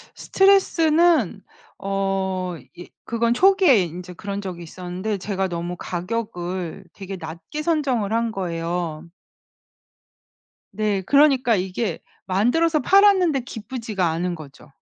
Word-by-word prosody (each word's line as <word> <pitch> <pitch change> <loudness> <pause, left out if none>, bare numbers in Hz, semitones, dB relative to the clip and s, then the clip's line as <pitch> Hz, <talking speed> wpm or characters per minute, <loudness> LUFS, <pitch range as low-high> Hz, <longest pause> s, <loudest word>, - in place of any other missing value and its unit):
스트레스는 335 - +3 0.4
어 190 -2 -2 0.2
예 175 - -10 0.2
그건 235 0 +1
초기에 365 - +5
인제 180 +2 -8
그런 200 +3 -5
적이 180 -3 -6
있었는데 185 +5 -5
제가 195 0 -2
너무 175 0 -4
가격을 180 -2 -4
되게 195 -1 -7
낮게 165 - -7
선정을 275 -10 0
한 230 0 0
거예요. 170 -3 -4 1.6
네 205 -1 0
그러니까 265 +1 +4
이게 185 0 -2 0.3
만들어서 275 - +2
팔았는데 375 -4 +4
기쁘지가 225 -5 -4
않은 175 +2 -2
거죠. 150 -2 -13
195 Hz, 255 characters per minute, -22 LUFS, 180-255 Hz, 1.6 s, 초기에